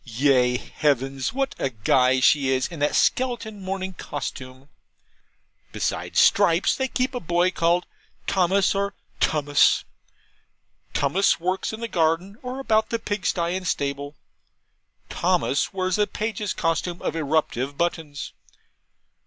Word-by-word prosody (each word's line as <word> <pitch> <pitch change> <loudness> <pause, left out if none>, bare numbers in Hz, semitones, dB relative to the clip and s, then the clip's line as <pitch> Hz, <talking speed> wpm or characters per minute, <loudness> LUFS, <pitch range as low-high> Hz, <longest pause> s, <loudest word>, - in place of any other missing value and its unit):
Ye 125 0 +2
heavens! 135 -1 -1
what 270 +2 -1
a 135 - 0
guy 130 +3 +2
she 140 0 +4
is 130 -1 +1
in 170 - -7
that 145 +1 +1
skeleton 235 -5 0
morning 190 0 -4
costume! 130 -4 -7 1.0
Besides - - -1
Stripes, 165 +3 +4
they 265 - -1
keep 255 +1 -1
a 245 - -2
boy 175 +1 +1
called 175 0 +1 0.4
Thomas 190 +1 +2
or 200 0 -2 0.2
Tummus. 145 -2 +3 1.1
Tummus 170 +9 +2
works 185 +2 -1
in 220 +1 -7
the 230 - -2
garden 175 +3 0
or 255 +1 -5
about 220 -4 +1
the 230 - 0
pigsty 185 -5 -1
and 185 -1 -4
stable; 140 0 -2 0.9
Thomas 175 -6 0
wears 185 -1 -1
a 210 - +3
page's 215 -2 -3
costume 165 +2 -1
of - - -2
eruptive 145 -3 -1
buttons. 160 -4 -3
170 Hz, 130 wpm, -24 LUFS, 140-200 Hz, 1.1 s, she